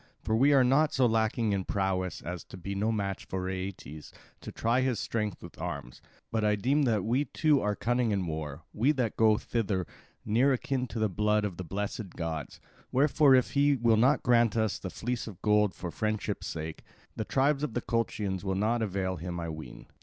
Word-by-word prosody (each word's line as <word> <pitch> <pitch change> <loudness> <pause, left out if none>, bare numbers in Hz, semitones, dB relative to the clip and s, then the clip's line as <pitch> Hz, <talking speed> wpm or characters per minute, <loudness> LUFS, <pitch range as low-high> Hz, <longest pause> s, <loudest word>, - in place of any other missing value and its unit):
For 110 - +1
we 135 +6 +5
are 135 -2 +6
not 140 +5 +3
so 130 - +4
lacking 110 -1 +1
in 95 -1 0
prowess 95 -2 -1
as 90 0 -5
to - - -11
be 100 +2 -5
no 105 +3 0
match 100 -3 -3
for 95 -1 -3
Aeetes 95 -5 -6 0.3
to - - -8
try 120 +3 +1
his 130 -5 0
strength 105 -4 -3
with - - -11
arms; 65 -3 -6 0.3
but 110 -1 0
I 105 0 +3
deem 140 +8 +2
that 110 -6 +1
we 125 +6 +1
too 150 +1 +2
are 105 0 0
cunning 120 +1 0
in 100 -3 0
war, 80 -1 -5
we 130 +8 +3
that 125 -6 -1
go 110 -1 +4
thither, 100 -7 -1 0.4
near 125 +6 +3
akin 130 0 -1
to 115 0 -7
the 110 -1 +2
blood 105 +2 +1
of 95 -4 -4
the 95 - -4
blessed 100 +2 -4
gods. 80 -3 -4 0.3
Wherefore 140 +1 +5
if 130 - +2
he 145 0 +3
will 115 -3 +3
not 130 +7 +3
grant 115 -2 +3
us 110 -2 0
the 95 - -5
fleece 120 +4 -3
of 100 -5 -9
gold 105 -2 +3
for 85 - -5
friendship's 105 +4 -2
sake, 80 -1 -5 0.3
the 110 - -2
tribes 140 +5 +1
of 150 -7 -3
the 120 - 0
Colchians 105 -5 -2
will 95 -1 -1
not 110 +4 +1
avail 95 -3 -1
him, 85 +2 -5
I 85 -1 -4
ween." 80 0 -8
105 Hz, 205 wpm, -29 LUFS, 95-120 Hz, 0.4 s, are